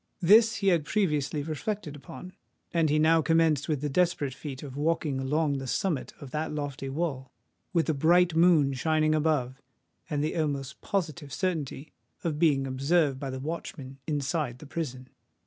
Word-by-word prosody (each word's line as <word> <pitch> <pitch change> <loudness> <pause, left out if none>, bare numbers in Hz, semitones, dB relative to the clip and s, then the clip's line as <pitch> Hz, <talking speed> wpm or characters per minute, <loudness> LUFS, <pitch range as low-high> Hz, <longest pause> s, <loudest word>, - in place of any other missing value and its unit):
This 220 +5 +6
he 195 -1 +2
had 170 -4 +3
previously 150 -5 0
reflected 160 +1 -4
upon; 145 +5 -10 0.4
and 165 -2 +3
he 150 - +3
now 160 +1 +4
commenced 160 -3 +2
the 150 -2 -1
desperate 145 -3 +1
feat 135 0 -7
of 135 -3 -8
walking 150 -2 0
along 145 +1 0
the 135 - -6
summit 160 +1 -1
of 140 -4 -10
that 155 +2 -2
lofty 145 -2 -4
wall—with 155 +3 -4
a 160 - +2
bright 170 +4 +4
moon 165 -5 +5
shining 155 +3 +2
above, 145 -5 0 0.5
and 145 -1 -1
the 155 - -1
almost 145 -3 -2
positive 160 -6 -3
certainty 155 -5 -3 0.3
of 155 -3 -2
being 145 -5 +3
observed 135 +2 +1
by 135 -1 -4
the 130 0 -5
watchmen 135 -2 -6
inside 145 -3 -1
the 150 - -12
prison. 135 -4 -5
150 Hz, 160 wpm, -28 LUFS, 135-165 Hz, 0.5 s, This